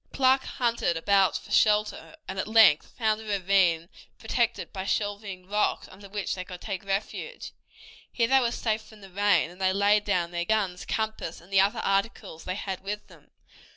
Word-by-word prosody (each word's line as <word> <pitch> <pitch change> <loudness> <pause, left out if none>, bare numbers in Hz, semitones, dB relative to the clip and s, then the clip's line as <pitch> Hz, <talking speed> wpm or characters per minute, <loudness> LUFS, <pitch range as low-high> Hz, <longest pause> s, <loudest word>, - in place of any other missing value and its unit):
Clark 265 0 +3
hunted 235 -8 0
about 195 +3 +3
for - - -13
shelter, 215 +10 +2
and 190 0 -5
at - - -2
length 220 -9 +5
found 220 -2 +1
a - - -10
ravine 190 -5 +2 0.3
protected 235 +1 -1
by 190 -2 -4
shelving 200 -2 -3
rocks 210 +1 0
under 200 +1 -13
which 205 0 -3
they 185 - -5
could 180 -1 -9
take 200 0 -5
refuge. 200 - -4 0.6
Here 230 -2 +1
they 270 +2 +5
were 240 -2 +1
safe 220 -2 -1
from 220 -1 -17
the 195 -1 -13
rain, 190 -4 +2
and 180 +2 -14
they 190 0 +2
laid 205 +1 +3
down 180 -4 0
their 175 0 -2
guns, 190 -2 -1
compass, 220 -6 -3
and 180 +4 -16
the 190 - +6
other 205 +4 +1
articles 195 -3 -2
they 185 - -3
had 195 -2 -4
with 210 +2 -6
them. - - -19
200 Hz, 190 wpm, -27 LUFS, 185-220 Hz, 0.6 s, the